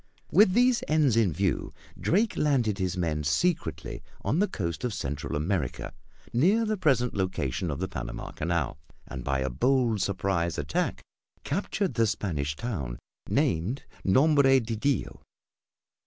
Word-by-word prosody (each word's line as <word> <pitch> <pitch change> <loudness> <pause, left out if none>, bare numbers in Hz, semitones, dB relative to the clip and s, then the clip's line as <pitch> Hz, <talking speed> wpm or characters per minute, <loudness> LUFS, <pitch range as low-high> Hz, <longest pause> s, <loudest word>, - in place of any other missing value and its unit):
With 200 -3 +6
these 245 +2 +4
ends 150 -6 +3
in 110 -6 +3
view, 95 +3 -1 0.2
Drake 210 +6 +1
landed 120 -9 +1
his 95 -1 -1
men 80 -4 -1
secretly 170 - -1 0.2
on 125 - +1
the 205 - +3
coast 85 - -4
of 120 -4 -1
Central 70 -4 -3
America 75 -3 -2 0.4
near 195 - +3
the 215 0 0
present 135 - +2
location 90 -4 -1
of 70 - -2
the - - -2
Panama - - -6
Canal; 85 -4 -2 0.3
and 65 -2 -7
by 70 -1 0
a 65 - 0
bold 120 - +2
surprise 95 -3 0
attack - - -1 0.4
captured 195 +4 -1
the 115 -1 +2
Spanish 75 -8 -2
town 75 - -4 0.3
named 95 - 0 0.2
Nombre 135 +5 +5
de 115 -1 -3
Dios. 140 +5 -1
105 Hz, 140 wpm, -28 LUFS, -, 0.4 s, With